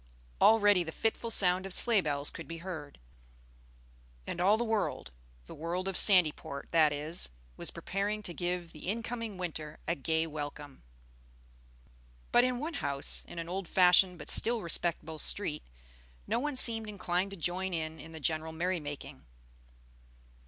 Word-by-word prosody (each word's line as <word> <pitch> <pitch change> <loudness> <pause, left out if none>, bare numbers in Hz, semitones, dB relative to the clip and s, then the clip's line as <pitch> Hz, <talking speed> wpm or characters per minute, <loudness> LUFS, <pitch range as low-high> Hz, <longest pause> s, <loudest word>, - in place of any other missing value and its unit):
Already 205 -4 +5
the 160 - -6
fitful 225 +5 -2
sound 190 -3 +2
of 190 - -3
sleigh 230 -5 +4
bells 145 -3 -2
could - - -9
be 165 - -6
heard; 165 -5 -8 1.3
and 170 - -4
all 200 +4 +4
the 240 - 0
world 220 - -2 0.3
the - - -10
world 175 +4 -3
of 195 - -3
Sandyport 160 -8 +3
that 155 -3 +4
is 150 - -1 0.3
was - - -4
preparing 205 +2 -3
to 175 - -4
give 175 -1 -3
the 155 +4 -7
in 230 +3 -2
coming 230 -4 -5
winter 155 -4 -5
a 165 - +2
gay 160 +1 0
welcome. 145 -2 -7 1.5
But 240 - +5
in 255 0 +1
one 310 +6 -4
house 140 0 0
in - - -10
an 165 0 -4
old 185 +1 -4
fashioned 180 0 +5
but 150 - -3
still 230 -2 +4
respectable 165 -2 -1
street 150 -2 -1 0.6
no - - 0
one 295 +2 -2
seemed 225 -4 +5
inclined 185 -2 -1
to 195 - -8
join 180 +3 -1
in 160 -1 -5
the 160 -1 -8
general 160 +1 -1
merry 175 +2 -1
making. 145 - -8
175 Hz, 160 wpm, -31 LUFS, 155-205 Hz, 1.5 s, Already